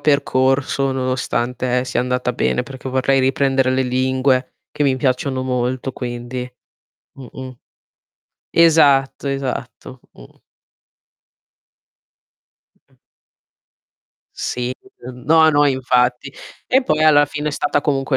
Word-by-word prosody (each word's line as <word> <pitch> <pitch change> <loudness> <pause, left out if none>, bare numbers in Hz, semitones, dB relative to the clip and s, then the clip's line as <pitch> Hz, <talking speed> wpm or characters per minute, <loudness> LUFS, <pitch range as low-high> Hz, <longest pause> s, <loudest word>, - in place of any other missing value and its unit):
percorso 135 -1 +1
nonostante 130 -1 -1
sia 125 - -1
andata 125 0 -1
bene, 125 - 0
perché 130 +1 -9
vorrei 130 +1 +1
riprendere 135 0 +1
le 130 0 +1
lingue 130 +1 0 0.2
che - - -3
mi 135 -2 +2
piacciono 130 0 -1
molto, 125 +1 -2
quindi 125 0 -6 0.6
mh-mh. 130 -1 -10 0.9
Esatto, 145 -5 +3
esatto, 130 -1 -5
mh. - - -17 2.4
Mh-mh. - - -34 1.4
Sì, 125 +1 -3 0.3
uhm, 125 0 -10
no, 160 +1 +5
no, 145 0 +3
infatti. 125 0 0 0.3
E 265 +2 +3
poi 155 -9 0
alla 145 -2 +5
fine 150 +1 -4
è - - -1
stata 145 0 -1
comunque 135 -2 0
130 Hz, 105 wpm, -19 LUFS, 125-140 Hz, 2.4 s, no